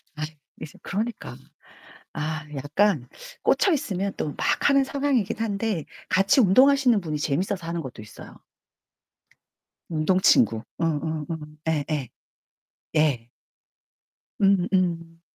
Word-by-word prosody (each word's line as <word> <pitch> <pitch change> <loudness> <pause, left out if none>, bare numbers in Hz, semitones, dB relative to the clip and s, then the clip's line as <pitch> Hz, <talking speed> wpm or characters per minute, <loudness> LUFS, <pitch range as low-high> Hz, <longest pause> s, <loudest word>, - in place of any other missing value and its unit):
아 155 - -5 0.4
이제 150 - -9
그러니까. 220 +4 -3 0.8
아 155 0 -3
약간 145 +1 +1 0.4
꽂혀있으면 205 - +1
또 - - -2
막 - - +1
하는 275 -1 +4
상황이긴 270 -7 0
한데 210 -5 -2 0.2
같이 195 - +4
운동하시는 255 +2 +5
분이 155 -3 -3
재밌어서 170 +5 -1
하는 170 0 -2
것도 130 -5 -8
있어요. 105 - -12 1.5
운동친구. 155 - +3 0.2
응응응 160 -2 -1 0.4
예예. 150 -4 -1 0.9
예. 140 -7 +2 1.1
음음. 180 -4 +1
170 Hz, 225 characters per minute, -25 LUFS, 155-205 Hz, 1.5 s, 운동하시는